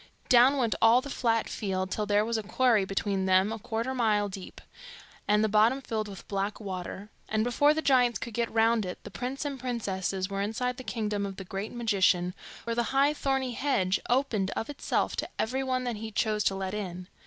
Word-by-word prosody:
Down 255 +3 +6
went 235 -5 +1
all 225 +2 +7
the 280 +2 -7
flat 230 -4 +1
field, 190 -2 -3
till 210 +1 -2
there 205 +1 +3
was 230 +1 -1
a 220 - 0
quarry 220 -1 +2
between 195 0 -1
them 190 +2 +4
a 225 - -4
quarter 230 +2 -3
of 260 - -4
a - - -4
mile 210 -3 +2
deep, 190 -1 -9 0.7
and 210 +1 +3
the - - +3
bottom 215 +5 +4
filled 220 -5 -3
with 195 -3 -10
black 200 +1 -2
water; 195 0 -6 0.2
and 215 0 +1
before 245 +5 +3
the 315 - -1
giants 250 -4 +4
could 235 - -7
get 235 +1 -1
round 225 0 +3
it, 180 -1 -5
the - - -9
prince 260 +4 -4
and 280 -2 -4
princesses 195 -6 -2
were 195 0 -3
inside 245 +4 -2
the 255 - -7
kingdom 210 -4 -2
of 195 -1 -4
the 195 - -6
great 195 +3 -5
magician, 190 -6 +2 0.3
where 230 0 -2
the 240 - +2 0.2
high 285 +2 +4
thorny 270 -3 -1
hedge 220 -8 +1
opened 240 -7 +1
of 225 - -3
itself 285 - -1
to - - -2
everyone 255 +2 -1
that 240 -3 -3
he 220 +1 -5
chose 215 -1 0
to 195 - +2
let 190 0 -3
in. 185 -4 -5
220 Hz, 215 wpm, -28 LUFS, 200-250 Hz, 0.7 s, all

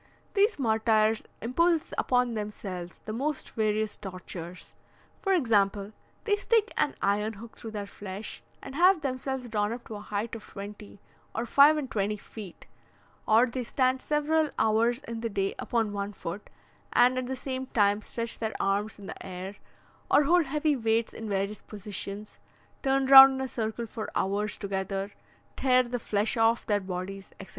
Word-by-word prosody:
These 415 +2 +3
martyrs 220 -3 +2 0.2
impose 330 +7 +1
upon 250 -1 +1
themselves 195 -5 -6
the 215 - -4
most 280 +5 -2
various 215 -1 0
tortures: 180 -2 -8 0.5
for 390 - 0
example, 210 - +2 0.3
they 415 -2 +2
stick 440 +1 +1
an 300 -2 +1
iron 210 +2 +1
hook 225 +2 -11
through 225 - -8
their 210 -2 -5
flesh, 200 +1 -7 0.2
and 270 - -8
have 355 +3 +5
themselves 265 -2 -3
drawn 210 -2 0
up 235 +1 -6
to - - -8
a 210 - -6
height 210 +2 -3
of 225 - -6
twenty 205 0 -10 0.4
or - - -1
five 285 +5 +6
and 280 -4 -4
twenty 210 0 0
feet; 200 -3 -11 0.6
or 225 +3 +6
they 255 +1 -4
stand 255 +2 +1
several 305 +1 +1
hours 230 +4 +2
in 230 -6 -6
the 230 - -2
day 195 -1 -1
upon 225 -3 0
one 200 0 -3
foot, 195 +2 -7 0.4
and 255 +1 +4
at 255 - -4
the 265 - -2
same 260 0 -4
time 205 -3 +2
stretch 230 +2 -3
their 220 -1 -3
arms 200 +2 0
in 200 - -11
the - - -8
air, 190 +2 -7 0.5
or 295 - +5
hold 340 +3 +4
heavy 300 +1 +1
weights 225 -2 0
in 225 -1 -6
various 200 +1 -2
positions, 205 0 -7 0.4
turn 270 -1 +2
round 270 0 +11
in 265 - -3
a 265 - -2
circle 225 -1 -3
for 220 0 -6
hours 205 +2 0
together, 195 0 -3 0.4
tear 255 -1 +4
the 245 0 -4
flesh 210 +1 0
off 225 +1 +3
their 205 -2 +2
bodies, 190 +1 -6
etc. 195 - -9
220 Hz, 170 wpm, -28 LUFS, 205-260 Hz, 0.6 s, round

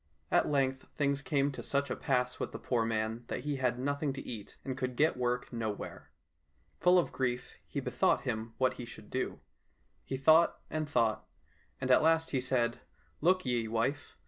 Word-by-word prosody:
At - - +3
length 135 -2 +1
things 140 -1 +1
came 140 0 +1
to 135 - -6
such 140 -1 0
a - - 0
pass 125 -3 0
with - - -3
the - - -4
poor 120 -3 0
man 110 +1 -1
that - - -3
he 145 -1 -2
had 125 -2 +1
nothing 140 +2 -1
to 135 - -7
eat, 110 -4 -7
and 130 - -2
could 130 -1 -3
get 155 +5 +3
work 125 0 -1
nowhere. 110 -3 -4 0.7
Full 180 +1 +6
of 175 - +2
grief, 125 -1 -2
he - - -3
bethought - - +1
him 110 +1 -3
what 130 -1 +2
he - - -5
should 110 -2 -12
do. 130 - -2 0.6
He 135 - -3
thought 160 +5 +5
and 155 -1 -2
thought, 110 -5 +1 0.5
and 130 0 0
at - - +7
last 160 +1 +3
he 130 - +1
said, 120 -2 +1 0.2
" - - -36
Look 185 +2 +3
ye, 120 -3 0
wife! 120 +7 -1
130 Hz, 195 wpm, -32 LUFS, 120-145 Hz, 0.7 s, at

